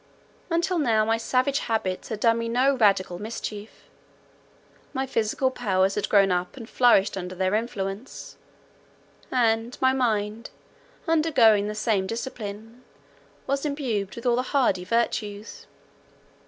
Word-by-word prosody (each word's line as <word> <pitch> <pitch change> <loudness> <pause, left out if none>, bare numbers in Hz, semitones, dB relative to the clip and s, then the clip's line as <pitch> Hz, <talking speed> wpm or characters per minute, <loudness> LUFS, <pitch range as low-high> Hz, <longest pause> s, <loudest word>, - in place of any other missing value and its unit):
Until 340 +1 0
now, 225 -7 +2
my 225 +1 +1
savage 255 +4 0
habits 205 -5 -2
had 220 - -4
done 230 -1 +3
me 230 0 -3
no 260 +4 +2
radical 195 -6 +2
mischief; 215 -1 -7 1.1
my 265 -1 -1
physical 255 +1 0
powers 195 -6 +1
had 210 - -2
grown 195 -2 +4
up 180 +6 -2
and 230 -4 -9
flourished 235 -7 +3
under 185 -1 -6
their 185 +1 0
influence, 210 0 -4 1.0
and 230 -1 +1
my 260 0 +3
mind, 220 -3 -1 0.6
undergoing 265 -11 +4
the 210 - -4
same 210 -3 0
discipline, 225 0 -7 0.6
was 275 0 -1
imbued 250 -10 -2
with 235 - -9
all 240 -1 +3
the - - +2 0.2
hardy 190 -9 +2
virtues. 210 0 -2
225 Hz, 130 wpm, -25 LUFS, 205-255 Hz, 1.1 s, grown